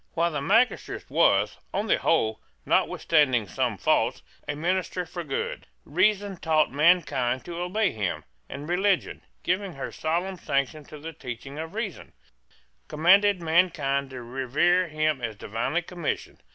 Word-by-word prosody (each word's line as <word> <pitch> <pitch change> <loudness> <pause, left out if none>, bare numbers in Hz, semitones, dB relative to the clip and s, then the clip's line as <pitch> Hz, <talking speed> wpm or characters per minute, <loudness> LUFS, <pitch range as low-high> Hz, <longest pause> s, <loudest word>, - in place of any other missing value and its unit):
While 170 +1 +2
the 150 -2 -2
magistrate 225 - +1
was, - - +3 0.2
on 205 - 0
the - - +2
whole, 110 -9 +1 0.2
notwithstanding 130 -9 +2
some - - -1
faults, - - +1 0.2
a 145 - -2
minister 180 +3 -1
for 175 +1 -6
good, 135 -4 -4 0.2
Reason 195 +4 +1
taught 160 -2 +2
mankind 140 -5 +2
to 170 -1 -6
obey 185 +4 0
him; 100 -5 -3 0.3
and 145 +2 -7
Religion, 190 +2 +1 0.2
giving 185 +1 -1
her 135 - -6
solemn 175 +4 -2
sanction 140 0 -1
to 150 - -11
the 160 +2 -8
teaching 135 0 -8
of 160 +4 -6
Reason, 215 -5 -5 0.7
commanded 185 +4 +4
mankind 160 -5 +2
to 130 -2 -8
revere 135 +9 +1
him 155 -3 0
as 115 -3 -3
divinely 115 +12 -2
commissioned. 175 -2 -4
160 Hz, 140 wpm, -26 LUFS, 140-180 Hz, 0.7 s, commanded